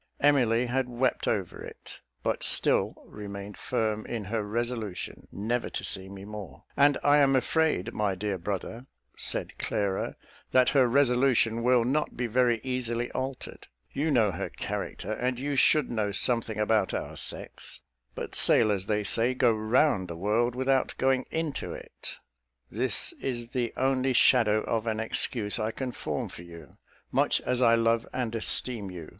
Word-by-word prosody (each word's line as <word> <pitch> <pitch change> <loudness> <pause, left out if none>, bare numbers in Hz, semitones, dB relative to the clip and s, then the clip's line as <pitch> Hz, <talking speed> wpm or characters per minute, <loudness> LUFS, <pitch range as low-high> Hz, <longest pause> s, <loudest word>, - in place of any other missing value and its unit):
Emily 125 -5 +3
had 125 +1 -1
wept 125 +1 0
over - - -2
it, - - -11 0.2
but - - -1
still - - +3
remained 100 -1 -8
firm 110 -1 -2
in 115 -3 -4
her 110 +3 -2
resolution 110 -2 -4
never 115 +5 -2
to - - -5
see 95 0 -3
me 100 0 -9
more 105 -3 -9
"And 145 0 +4
I 145 +1 +5
am 135 -1 +4
afraid, 130 - +1
my 105 -3 0
dear 100 -1 -3
brother," 105 +7 -5 0.3
said - - -2
Clara, 100 -2 -2 0.3
"that 130 -1 +4
her 135 -3 +4
resolution 125 -3 +3
will 125 -1 +3
not 150 +5 -1
be 125 - -1
very 120 0 +2
easily 120 -2 -2
altered. 130 0 -6 0.2
You 155 +3 -1
know 115 -8 +3
her 80 - -4
character, - - -5
and 125 +2 -1
you 140 +3 -2
should 150 +1 +3
know 110 -3 -1
something 115 0 +1
about 105 -2 +1
our - - -5
sex; - - -4 0.3
but - - -6
sailors, 100 -4 +4
they 105 0 0
say, 115 +5 +1
go 125 -2 +3
round 110 -1 +2
the 85 -1 -7
world 115 +6 +1
without 130 +1 +1
going 130 -1 +1
into 160 -3 -3
it. - - -8 0.6
This 130 - +1
is 120 -3 -4
the 120 -2 -2
only 130 0 +1
shadow 115 -4 +4
of 115 0 -2
an 110 -1 -1
excuse 110 -1 0
I 110 - 0
can 130 +2 -4
form - - -4
for - - -11
you, 85 -4 -13 0.3
much - - +3
as 125 0 -1
I 115 -2 +6
love 115 0 +1
and 120 -3 -3
esteem 115 -2 -2
you. 85 -4 -8
115 Hz, 160 wpm, -28 LUFS, 105-130 Hz, 0.6 s, I